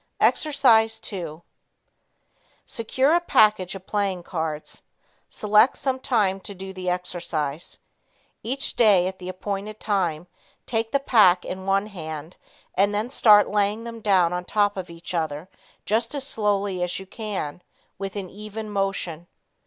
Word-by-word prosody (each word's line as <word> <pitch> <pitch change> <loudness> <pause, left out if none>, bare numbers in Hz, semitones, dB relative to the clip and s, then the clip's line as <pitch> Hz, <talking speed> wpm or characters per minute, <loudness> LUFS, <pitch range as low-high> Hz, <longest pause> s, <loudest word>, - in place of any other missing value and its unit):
Exercise 225 -7 +4
2 170 -5 -7 1.2
Secure 260 +5 +1
a 345 - +5
package 210 - +3
of 190 -1 -10
playing 195 -4 -1
cards. 160 -4 -4 0.5
Select 210 +4 +3
some 265 -3 -1
time 205 -7 +1
to 200 +1 -8
do 190 +1 -8
the 185 -1 -3
exercise. 170 -4 -3 0.6
Each 260 +5 -2
day 205 -6 +5
at 190 0 -4
the 180 0 -6
appointed 200 +3 -5
time, 175 -6 -1 0.4
take 225 -1 -1
the 280 - +2
pack 210 -9 +5
in 190 +1 -6
one 195 +1 +2
hand 160 -5 -7 0.4
and 200 +2 +2
then 220 +4 -2
start 210 -6 +6
laying 210 +2 +1
them 230 -1 -7
down 185 -5 +3
on 180 0 -2
top 205 +2 +1
of 185 -2 -6
each 170 +1 -8
other 160 -1 -2 0.4
just 230 +5 0
as 275 -2 -3
slowly 205 -6 0
as 180 0 -1
you 190 - -7
can, 190 -7 -5 0.4
with 195 0 -5
an 195 -2 -4
even 215 +2 -8
motion. 195 -4 -2
195 Hz, 145 wpm, -24 LUFS, 180-215 Hz, 1.2 s, start